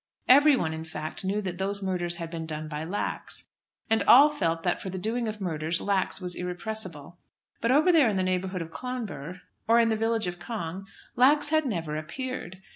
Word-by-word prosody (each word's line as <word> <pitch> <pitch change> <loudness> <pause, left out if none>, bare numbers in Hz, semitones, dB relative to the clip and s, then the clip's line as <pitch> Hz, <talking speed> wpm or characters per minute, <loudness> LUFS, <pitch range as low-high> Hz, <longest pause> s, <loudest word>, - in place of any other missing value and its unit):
Everyone, 265 - +5
in 160 0 -5
fact, 155 +1 -5
knew 200 +3 -1
that 180 -2 -4
those 200 +1 -2
murders 175 -2 -1
had 165 -1 -6
been 165 -1 -5
done 155 0 -5
by 150 0 -5
Lax. 185 +6 -4 0.4
And 225 -1 +2
all 280 +5 +9
felt 165 - -1
that 175 - 0
for 190 - -5
the 190 - -5
doing 225 +5 -2
of 215 0 -4
murders 165 -3 -1
Lax 195 -2 0
was 180 -2 -4
irrepressible. 180 -3 -5 0.4
But 230 - +1
over 305 +7 +5
there 305 -8 +5
in 200 - -1
the 185 - +1
neighbourhood 185 -1 -1
of 165 - -12
Clonbur, 205 - -6 0.3
or 230 +1 +5
in 230 -1 +4
the 220 - +2
village 225 0 0
of 175 0 -4
Cong, 185 -1 -5 0.3
Lax 290 +4 +4
had 315 -1 +2
never 165 -8 -3
appeared. 190 - -6
190 Hz, 200 wpm, -27 LUFS, 165-230 Hz, 0.4 s, all